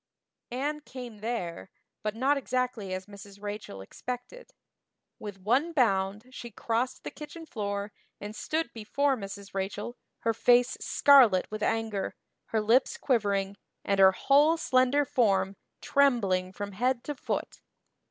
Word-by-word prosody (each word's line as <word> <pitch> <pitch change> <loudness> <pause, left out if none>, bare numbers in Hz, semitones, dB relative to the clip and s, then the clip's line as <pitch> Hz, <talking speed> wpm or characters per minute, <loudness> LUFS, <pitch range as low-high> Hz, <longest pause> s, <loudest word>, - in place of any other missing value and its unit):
Anne 285 +5 -2
"came 250 -6 -9
there," 205 -6 -4 0.3
but 215 0 -2
not 265 +5 +2
exactly 250 -7 -2
as 185 0 -4
Mrs. 200 0 -12
Rachel 205 - -6
expected. 250 - -7 0.7
With 205 -2 -7
one 260 - +1
bound 200 -5 +1
she 240 -2 -8
crossed 230 +3 -2
the - - -5
kitchen 305 +2 -9
floor 200 -5 -3 0.3
and 210 +1 -7
stood 315 +7 -2
before 270 +5 0
Mrs. 200 -2 -8
Rachel, 200 +5 -3 0.3
her 230 - +1
face 245 +2 +4
scarlet 250 -10 +6
with 215 0 -5
anger, 220 -2 -1 0.3
her 220 - 0
lips 230 +5 +3
quivering, 200 -5 0 0.3
and 200 -1 +1
her 190 0 +8
whole 290 - +4
slender 270 -1 +3
form 195 -6 +2 0.3
trembling 200 -10 +2
from 205 +1 -6
head 240 +5 0
to 295 - -3
foot. 275 - -4
225 Hz, 135 wpm, -29 LUFS, 200-260 Hz, 0.7 s, her